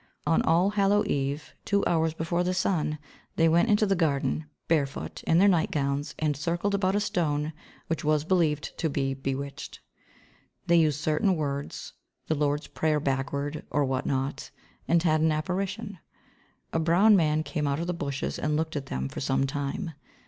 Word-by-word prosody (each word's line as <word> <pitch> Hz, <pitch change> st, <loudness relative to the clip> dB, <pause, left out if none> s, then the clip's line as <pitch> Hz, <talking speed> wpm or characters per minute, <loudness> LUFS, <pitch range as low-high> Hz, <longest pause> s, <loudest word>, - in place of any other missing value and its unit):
On 160 Hz, +2 st, +3 dB
All 175 Hz, +5 st, +3 dB
Hallow 205 Hz, 0 st, +3 dB
Eve, 140 Hz, +1 st, -2 dB
two 200 Hz, 0 st, +1 dB
hours 160 Hz, -1 st, +1 dB
before 170 Hz, +2 st, -1 dB
the 180 Hz, +1 st, 0 dB
sun, 165 Hz, -5 st, 0 dB, 0.4 s
they 165 Hz, -, +4 dB
went 170 Hz, +8 st, +3 dB
into 210 Hz, 0 st, +4 dB
the 195 Hz, -1 st, +2 dB
garden, 155 Hz, -2 st, 0 dB, 0.2 s
barefoot, 145 Hz, -4 st, -1 dB
in 165 Hz, -, +4 dB
their 195 Hz, +3 st, +6 dB
nightgowns 145 Hz, -5 st, 0 dB
and 150 Hz, -2 st, 0 dB
circled 170 Hz, +7 st, -1 dB
about 195 Hz, -1 st, +1 dB
a -, -, +3 dB
stone 155 Hz, -6 st, -1 dB, 0.3 s
which 165 Hz, -, -3 dB
was 150 Hz, -1 st, +2 dB
believed 160 Hz, -4 st, +1 dB
to 160 Hz, -, +1 dB
be 135 Hz, -1 st, -1 dB
bewitched. 135 Hz, +1 st, -5 dB, 0.9 s
They 170 Hz, -, +4 dB
used 155 Hz, -3 st, +3 dB
certain 155 Hz, +5 st, +1 dB
words, 140 Hz, -3 st, -4 dB, 0.3 s
the -, -, 0 dB
Lord's 145 Hz, 0 st, 0 dB
prayer 155 Hz, -1 st, 0 dB
backward 140 Hz, +2 st, -2 dB
or 145 Hz, -1 st, +1 dB
what 130 Hz, 0 st, -2 dB
not, 135 Hz, +1 st, -2 dB, 0.4 s
and 170 Hz, 0 st, +3 dB
had 155 Hz, -2 st, +3 dB
an 160 Hz, 0 st, +3 dB
apparition. 190 Hz, +5 st, -3 dB, 0.7 s
A 165 Hz, -, +2 dB
brown 175 Hz, +7 st, +5 dB
man 155 Hz, -3 st, +2 dB
came 150 Hz, -2 st, -2 dB
out 140 Hz, +1 st, 0 dB
of 170 Hz, -, -2 dB
the 175 Hz, -, -1 dB
bushes 140 Hz, -5 st, -3 dB
and 150 Hz, 0 st, 0 dB
looked 160 Hz, 0 st, -2 dB
at 140 Hz, -2 st, -4 dB
them 65 Hz, +1 st, -3 dB
for -, -, -7 dB
some 135 Hz, 0 st, +1 dB
time. 145 Hz, +5 st, -3 dB
155 Hz, 175 wpm, -27 LUFS, 145-175 Hz, 0.9 s, their